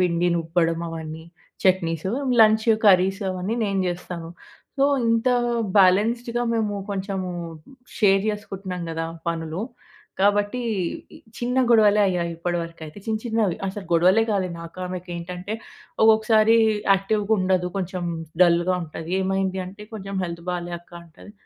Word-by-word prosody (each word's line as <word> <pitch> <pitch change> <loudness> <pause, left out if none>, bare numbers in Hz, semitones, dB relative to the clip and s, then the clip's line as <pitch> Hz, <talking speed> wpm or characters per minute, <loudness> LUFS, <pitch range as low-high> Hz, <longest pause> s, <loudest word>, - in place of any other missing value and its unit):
పిండి 175 -1 +2
నూర్పడం, 165 0 0
అవన్నీ, 160 -1 -7 0.4
chutneys. 175 -2 +1 0.3
Lunch, 220 +1 +5 0.2
curries 190 +1 +4
అవన్నీ 185 +4 -3
నేను 195 -1 0
చేస్తాను. 175 -1 -6 0.5
సో, 275 - +4 0.2
ఇంత 230 +2 +2 0.5
బ్యాలెన్స్‌డ్‌గా 230 +6 +3
మేము 215 -2 0 0.2
కొంచెము 190 -1 -3 0.7
షేర్ 195 -2 +4
చేసుకుంటున్నాం 195 -3 -6
కదా! 165 0 -3 0.2
పనులు. 165 +3 -3 0.6
కాబట్టి 205 +4 +2 0.8
చిన్న 245 +1 -2
గొడవలే 210 -2 +5
అయ్యాయి 175 -2 -1
ఇప్పటివరకైతే. 170 -1 -4
చిన్న 220 -1 0
చిన్నవి 220 -6 0
అసలు 195 0 -5
గొడవలే 185 +6 +5
కాలే 195 -3 0
నాకు 170 +2 -10
ఆమెకి 180 0 -6
ఏంటంటే, 180 +3 -6 0.5
ఒక్కొక్కసారి 220 0 +5 0.4
యాక్టివ్‌గా 205 +2 0
ఉండదు. 185 -1 +1
కొంచెం 185 -1 -3 0.4
డల్‌గా 175 +1 +3
ఉంటది. 160 0 -7
"ఏమైంది" 190 0 -1
అంటే, 195 +3 -10
"కొంచెం 200 -2 -6
హెల్త్ 170 -1 -6
బాలే 175 -1 -4
అక్క" 175 +1 -27
అంటది. 170 +5 -15
185 Hz, 125 wpm, -23 LUFS, 175-210 Hz, 0.8 s, Lunch